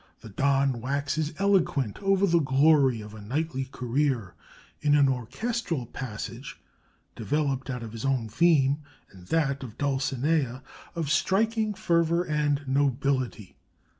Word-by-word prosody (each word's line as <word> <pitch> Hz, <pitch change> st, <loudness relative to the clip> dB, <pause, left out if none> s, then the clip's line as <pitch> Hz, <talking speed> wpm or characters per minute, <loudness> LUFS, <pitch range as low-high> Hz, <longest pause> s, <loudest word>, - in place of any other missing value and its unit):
The 115 Hz, -, -10 dB
Don 135 Hz, +2 st, +1 dB
waxes 140 Hz, +4 st, -1 dB
eloquent 180 Hz, -, +1 dB
over 195 Hz, 0 st, +3 dB
the 170 Hz, -3 st, +3 dB
glory 135 Hz, -3 st, +3 dB
of 105 Hz, 0 st, -10 dB
a 110 Hz, -, -10 dB
knightly 135 Hz, +4 st, -2 dB
career, 125 Hz, -5 st, -1 dB, 0.5 s
in 145 Hz, 0 st, +3 dB
an 145 Hz, -1 st, +5 dB
orchestral 135 Hz, -, -2 dB
passage 120 Hz, +1 st, -7 dB, 0.6 s
(developed 140 Hz, -3 st, -1 dB
out 125 Hz, -2 st, -4 dB
of 115 Hz, -, -7 dB
his 115 Hz, 0 st, -7 dB
own 130 Hz, -4 st, 0 dB
theme 140 Hz, +3 st, +3 dB, 0.3 s
and 90 Hz, -2 st, -15 dB
that 140 Hz, -4 st, 0 dB
of 120 Hz, -4 st, -9 dB
Dulcinea) 135 Hz, -1 st, 0 dB, 0.3 s
of 160 Hz, -4 st, -2 dB
striking 215 Hz, +6 st, +1 dB
fervor 170 Hz, -1 st, +2 dB
and 150 Hz, -3 st, 0 dB
nobility. 135 Hz, -5 st, 0 dB
140 Hz, 130 wpm, -27 LUFS, 125-160 Hz, 0.6 s, an